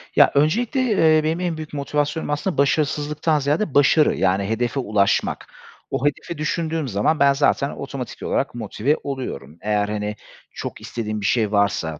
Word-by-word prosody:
Ya, - - +6
öncelikle, 220 - +2
eee, 160 -10 +3
benim 160 +2 0
en 175 -3 -2
büyük 155 -1 -8
motivasyonum 145 +2 -2
aslında 150 +5 -2
başarısızlıktan 150 +2 +1
ziyade 145 +4 0
başarı, 145 +2 +4
yani, 95 +1 +1
hedefe 120 +4 -1
ulaşmak. 100 -4 0 0.4
O 140 - -1
hedefi 145 +3 -2
düşündüğüm 160 0 -2
zaman 110 +8 +1
ben 140 0 +5
zaten 140 0 +2
otomatik 135 -4 -7
olarak 135 - -1
motive 120 +5 -1
oluyorum. 130 - -6
Eğer 105 -1 0
hani 105 0 -3 0.4
çok - - -7
istediğim 110 -2 -4
bir 100 - -4
şey 115 -3 +1
varsa 100 -7 0
140 Hz, 155 wpm, -22 LUFS, 110-155 Hz, 0.4 s, Ya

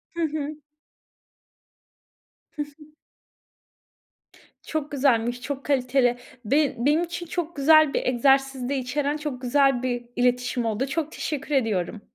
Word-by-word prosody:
Hı 340 - -2
hı. 305 -1 -3 2.0
Hı 300 - -3
hı. - - -13 2.0
Çok 310 -2 -3
güzelmiş, 245 -3 +1
çok 275 +1 -5
kaliteli. 250 -3 +2 0.3
Be 280 +5 +2
benim 300 +4 +3
için 345 0 -5
çok 345 -1 -4
güzel 310 +1 +5
bir - - -1
egzersiz 270 0 +2
de 280 - 0
içeren 280 +3 -1
çok 295 -4 -5
güzel 270 0 +2
bir 245 -1 -2
iletişim 245 0 +1
oldu. 225 +4 -1
Çok 310 +2 -2
teşekkür 300 -2 -3
ediyorum. 215 -5 0
275 Hz, 125 wpm, -25 LUFS, 250-300 Hz, 2.0 s, güzel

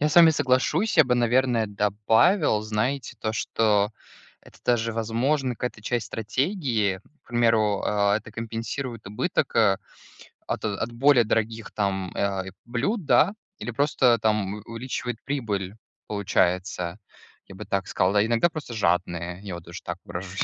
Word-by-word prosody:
Я 150 - +3
с 150 - -2
вами 170 -2 +9
соглашусь, 150 +8 +1
я 160 - +8
бы, 125 -1 +2
наверное, 120 -1 +2
добавил, 105 - +2
знаете, 110 +6 -2
то, 110 - -1
что 105 -2 +1 0.5
это - - -18
даже, 115 -1 +1
возможно, 125 +4 0
какая-то 120 -2 -5
часть 115 0 -1
стратегии. 115 - -1 0.2
К - - -27
примеру, 115 -4 +2
а, 100 0 +2
это 110 0 -7
компенсирует 115 +1 -5
убыток, 105 - -1
а, 100 -4 +4 0.7
от - - -3
от 110 +2 -2
более 130 +1 +5
дорогих 110 0 -1
там, 95 -3 -1
э, - - -4
а, 95 -2 0
и - - -7
блюд, 145 - -1
да, 190 +7 +4 0.3
или 120 - -4
просто 125 -2 +3
там 105 -2 0
у - - -7
увеличивает 120 0 -4
прибыль, 105 -8 -3 0.3
получается. 90 -3 0 0.5
Я 95 - -11
бы 105 - -8
так 95 -1 -1
сказал. 95 +2 +1
А 100 - +5
иногда 120 +9 +2
просто 155 -7 -7
жадные, 90 -3 -1
я 95 -4 -5
вот 85 - -10
тоже 85 +2 -9
так 90 +1 -4
выражусь. 90 +2 -4
110 Hz, 160 wpm, -25 LUFS, 100-125 Hz, 0.7 s, вами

